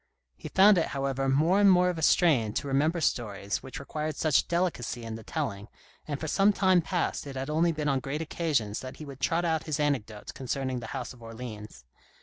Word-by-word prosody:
He - - -9
found 195 0 +6
it, 165 - 0
however, 135 0 -1
more 160 +8 +3
and 200 -1 +6
more 180 0 +4
of 170 - -6
a - - -4
strain 145 - +3
to 145 - -2
remember 150 +5 +1
stories 105 -7 -1
which 130 - -8
required 155 +2 -4
such 155 -2 +2
delicacy 170 -9 -1
in 115 -1 -6
the 115 - -7
telling, 100 -1 -4 0.4
and 145 -2 -3
for 155 - -4
some 195 +6 +4
time 185 -3 +4
past 170 -3 -2
it 135 - -7
had 135 +3 -3
only 165 +2 +2
been 150 -2 -3
on 135 -2 +2
great 140 +3 -4
occasions 145 -10 -1
that 130 0 -8
he 155 - -8
would 135 -2 -10
trot 170 +4 +1
out 160 -2 0
his 155 -2 -1
anec 145 -7 0
dotes 105 -2 -9
concerning 130 -1 -3
the 120 - -7
House 125 -1 -5
of 120 - -18
Orleans. 110 - -9
140 Hz, 220 wpm, -28 LUFS, 120-165 Hz, 0.4 s, found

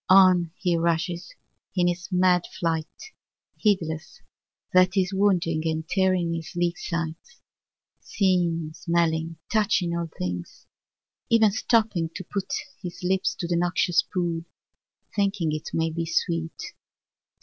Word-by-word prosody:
On 185 -3 +6
he 180 -3 +1
rushes, 170 +1 -1 0.4
in 180 -2 +3
his 175 +1 -2
mad 180 -1 +3
flight, 165 -2 0 0.7
heedless 165 -7 -1 0.5
that 185 +1 +5
he 190 - +4
is 185 +2 -6
wounding 180 -5 +2
and 160 0 -2
tearing 185 -3 +1
his 165 -1 -5
sleek 175 0 0
sides 170 - -4 0.7
â - - -33
seeing, 170 -5 +1
smelling, 165 -1 0 0.2
touching 200 -5 +2
of 170 - -1
all 170 -1 -3
things; 90 -1 -5 0.6
even 225 -2 +5
stopping 215 -6 +1
to 190 - -5
put 200 +7 -4 0.3
his 180 -1 -7
lips 190 +1 +1
to 170 - -4
the 170 - 0
noxious 175 0 +2
pool, 170 -2 -2 0.7
thinking 195 -5 +1
it 155 0 -4
may 165 0 0
be 165 +1 -3
sweet. 165 - -2
175 Hz, 135 wpm, -25 LUFS, 165-190 Hz, 0.7 s, On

